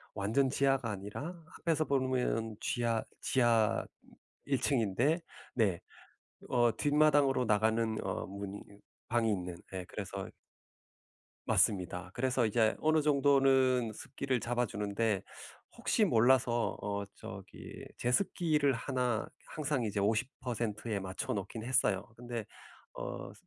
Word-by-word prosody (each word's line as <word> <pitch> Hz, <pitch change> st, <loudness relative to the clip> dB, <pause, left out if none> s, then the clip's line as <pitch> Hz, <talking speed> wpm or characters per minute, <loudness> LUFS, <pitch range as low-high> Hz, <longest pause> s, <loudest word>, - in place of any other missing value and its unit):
완전 110 Hz, +7 st, +2 dB
지하가 135 Hz, -2 st, +2 dB
아니라 140 Hz, -, -6 dB, 0.2 s
앞에서 160 Hz, -3 st, +1 dB
보면 125 Hz, -5 st, 0 dB
쥐하 115 Hz, -2 st, 0 dB, 0.2 s
지하 115 Hz, -4 st, +3 dB, 0.6 s
1 135 Hz, -2 st, +1 dB
층인데 130 Hz, -, +2 dB, 0.4 s
네 100 Hz, -8 st, +2 dB, 0.7 s
어 120 Hz, -3 st, +3 dB
뒷마당으로 145 Hz, -2 st, +4 dB
나가는 110 Hz, +1 st, +2 dB
어 -, -, -2 dB
문이 100 Hz, +1 st, -6 dB
있 100 Hz, 0 st, -17 dB, 0.3 s
방이 115 Hz, -1 st, +2 dB
있는 90 Hz, -3 st, -3 dB, 0.2 s
예 95 Hz, -, -4 dB
그래서 -, -, -5 dB, 1.2 s
맞습니다. 90 Hz, -2 st, +1 dB
그래서 125 Hz, -1 st, +1 dB
이제 110 Hz, 0 st, +3 dB
어느 155 Hz, 0 st, +3 dB
정도는 135 Hz, -4 st, +4 dB
습기를 130 Hz, +2 st, -2 dB
잡아 120 Hz, +1 st, 0 dB
주는데 105 Hz, -1 st, -1 dB, 0.6 s
혹시 -, -, +2 dB
몰라서 120 Hz, 0 st, +3 dB
어 100 Hz, 0 st, -2 dB
저기 95 Hz, 0 st, -9 dB
제습기를 150 Hz, +1 st, +2 dB
1 125 Hz, -2 st, -1 dB, 0.2 s
항상 145 Hz, -4 st, -2 dB
이제 105 Hz, -2 st, -1 dB
50%에 110 Hz, -1 st, -1 dB
맞춰 95 Hz, -1 st, -3 dB
놓긴 100 Hz, +2 st, -4 dB
했어요. 105 Hz, -6 st, +2 dB
근데 120 Hz, -2 st, -5 dB, 0.5 s
어 -, -, -6 dB
120 Hz, 235 characters per minute, -32 LUFS, 105-135 Hz, 1.2 s, 뒷마당으로